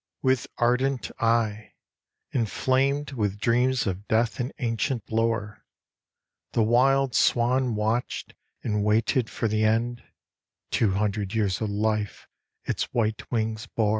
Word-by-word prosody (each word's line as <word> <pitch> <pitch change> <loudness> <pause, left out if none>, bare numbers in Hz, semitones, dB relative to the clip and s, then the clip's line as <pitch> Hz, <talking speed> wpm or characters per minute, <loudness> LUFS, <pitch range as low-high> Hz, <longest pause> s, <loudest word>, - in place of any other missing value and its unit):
With 130 -2 +2
ardent 125 +2 +1
eye, 115 -3 0 0.6
Inflamed 135 +4 +1
with 105 -6 -1
dreams 125 +4 +2
of 100 +1 -3
death 115 +2 +1
and 125 +1 -2
ancient 115 -1 -2
lore, 110 -2 -1 0.9
The 115 - +3
wild 130 +3 +3
swan 125 +1 +2
watched 110 +3 -2 0.3
and 105 -2 0
waited 110 +3 +2
for 115 - -1
the 110 0 +1
end 115 +2 +1 0.7
Two 105 -4 +2
hundred 100 0 -1
years 100 -4 0
of 110 - -1
life 105 0 -1 0.4
its - - -1
white 110 -2 -1
wings 110 -2 -1
bore. 110 -2 0
115 Hz, 125 wpm, -26 LUFS, 105-125 Hz, 0.9 s, The